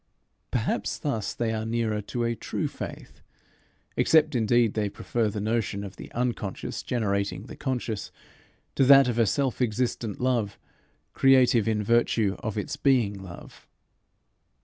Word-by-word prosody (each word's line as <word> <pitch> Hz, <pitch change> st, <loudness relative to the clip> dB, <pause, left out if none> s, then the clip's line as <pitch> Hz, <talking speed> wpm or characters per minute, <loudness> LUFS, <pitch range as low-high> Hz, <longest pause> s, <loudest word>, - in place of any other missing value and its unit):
Perhaps -, -, -1 dB
thus 115 Hz, -8 st, -2 dB
they 115 Hz, -1 st, -1 dB
are 110 Hz, 0 st, -2 dB
nearer 110 Hz, -2 st, -1 dB
to 120 Hz, +4 st, -3 dB
a 115 Hz, 0 st, +1 dB
true -, -, -3 dB
faith -, -, -8 dB, 0.7 s
except 155 Hz, -1 st, +4 dB
indeed 120 Hz, -1 st, +3 dB
they 105 Hz, -2 st, -1 dB
prefer 110 Hz, +2 st, -1 dB
the 105 Hz, -, -4 dB
notion 105 Hz, -1 st, -1 dB
of 100 Hz, -1 st, -8 dB
the -, -, -10 dB
Unconscious 120 Hz, -5 st, -3 dB
generating 100 Hz, -4 st, -1 dB
the 120 Hz, -, -10 dB
Conscious, 125 Hz, -6 st, -3 dB, 0.6 s
to -, -, +3 dB
that 135 Hz, 0 st, +8 dB
of 120 Hz, -1 st, -1 dB
a 115 Hz, -, +4 dB
self 135 Hz, +3 st, 0 dB
existent 115 Hz, -2 st, -1 dB
Love, 120 Hz, -5 st, 0 dB, 0.6 s
creative 130 Hz, -4 st, +4 dB
in 105 Hz, -1 st, +1 dB
virtue 110 Hz, -2 st, +2 dB
of 110 Hz, -3 st, -4 dB
its 105 Hz, -, -3 dB
being 125 Hz, -7 st, +2 dB
love. 95 Hz, -3 st, -11 dB
115 Hz, 145 wpm, -26 LUFS, 105-125 Hz, 0.7 s, that